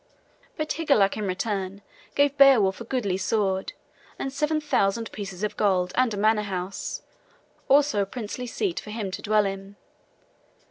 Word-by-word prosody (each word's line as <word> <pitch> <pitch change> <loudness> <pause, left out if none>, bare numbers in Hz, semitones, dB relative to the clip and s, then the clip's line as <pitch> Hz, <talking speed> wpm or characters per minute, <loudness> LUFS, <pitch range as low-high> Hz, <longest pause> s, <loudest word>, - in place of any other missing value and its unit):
But 310 0 -1
Higelac 280 -12 +2
in 210 -2 -3
return 195 0 -3 0.3
gave 285 0 +3
Beowulf 240 -9 +5
a - - -6
goodly 215 -7 -1
sword 195 -1 0 0.4
and 270 - -4
seven 300 +2 0
thousand 225 -6 0
pieces 195 -2 -7
of 210 - -1
gold 185 -3 +1
and 255 -2 +3
a 205 - -4
manor 215 +1 +3
house, 190 -1 -4 0.6
also 280 -6 +4
a 195 - -1
princely 245 +3 -5
seat 360 - -2
for - - -10
him 210 -3 -4
to - - -5
dwell 210 0 +2
in. 195 0 -5
210 Hz, 155 wpm, -25 LUFS, 195-260 Hz, 0.6 s, Beowulf